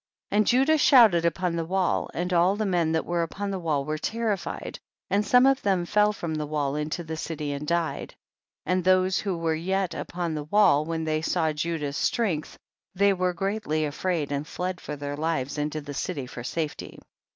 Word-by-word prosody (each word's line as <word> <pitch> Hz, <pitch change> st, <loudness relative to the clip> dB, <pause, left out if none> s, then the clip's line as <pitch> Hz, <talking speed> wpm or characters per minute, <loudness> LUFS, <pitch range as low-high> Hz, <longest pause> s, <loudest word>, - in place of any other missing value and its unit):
30. -, -, -1 dB
And 215 Hz, -, +3 dB
Judah 270 Hz, +6 st, +4 dB
shouted 220 Hz, -13 st, +6 dB
upon 170 Hz, +1 st, 0 dB
the 165 Hz, -, -1 dB
wall, 185 Hz, +2 st, 0 dB
and 180 Hz, +2 st, -2 dB
all 180 Hz, +3 st, +4 dB
the 215 Hz, +1 st, -1 dB
men 175 Hz, -4 st, +1 dB
that 160 Hz, -, 0 dB
were 175 Hz, 0 st, 0 dB
upon 200 Hz, +4 st, -3 dB
the 190 Hz, -, -3 dB
wall 150 Hz, -5 st, -1 dB
were 155 Hz, +1 st, -3 dB
terrified, 220 Hz, -2 st, -3 dB, 0.3 s
and 205 Hz, +1 st, +3 dB
some 250 Hz, +5 st, +5 dB
of 270 Hz, 0 st, +3 dB
them 190 Hz, -3 st, +1 dB
fell 210 Hz, +3 st, +3 dB
from 170 Hz, -6 st, -4 dB
the 155 Hz, -1 st, -3 dB
wall 145 Hz, -2 st, -1 dB
into 150 Hz, +3 st, -3 dB
the 160 Hz, 0 st, -5 dB
city 155 Hz, -2 st, -4 dB
and 145 Hz, +1 st, -5 dB
died, 170 Hz, 0 st, -2 dB, 0.5 s
and 180 Hz, +2 st, +1 dB
those 185 Hz, +1 st, +3 dB
who 195 Hz, -4 st, -2 dB
were 165 Hz, -1 st, 0 dB
yet 185 Hz, +3 st, -1 dB
upon 175 Hz, -2 st, -4 dB
the 150 Hz, -1 st, -4 dB
wall, 170 Hz, -4 st, +4 dB
when 165 Hz, 0 st, -2 dB
they 155 Hz, 0 st, 0 dB
saw 160 Hz, -1 st, 0 dB
Judah's 150 Hz, -2 st, -2 dB
strength, 185 Hz, -11 st, -1 dB, 0.4 s
they 200 Hz, +1 st, +4 dB
were 185 Hz, -1 st, 0 dB
greatly 195 Hz, -5 st, -1 dB
afraid 150 Hz, 0 st, -2 dB
and 145 Hz, +1 st, -2 dB
fled 180 Hz, 0 st, -4 dB
for 150 Hz, -, -5 dB
their 145 Hz, 0 st, -5 dB
lives 150 Hz, -2 st, -2 dB
into 150 Hz, +1 st, -2 dB
the 145 Hz, 0 st, -8 dB
city 140 Hz, -1 st, -3 dB
for 125 Hz, -1 st, -8 dB
safety. 155 Hz, +3 st, -4 dB
170 Hz, 200 wpm, -26 LUFS, 155-190 Hz, 0.5 s, shouted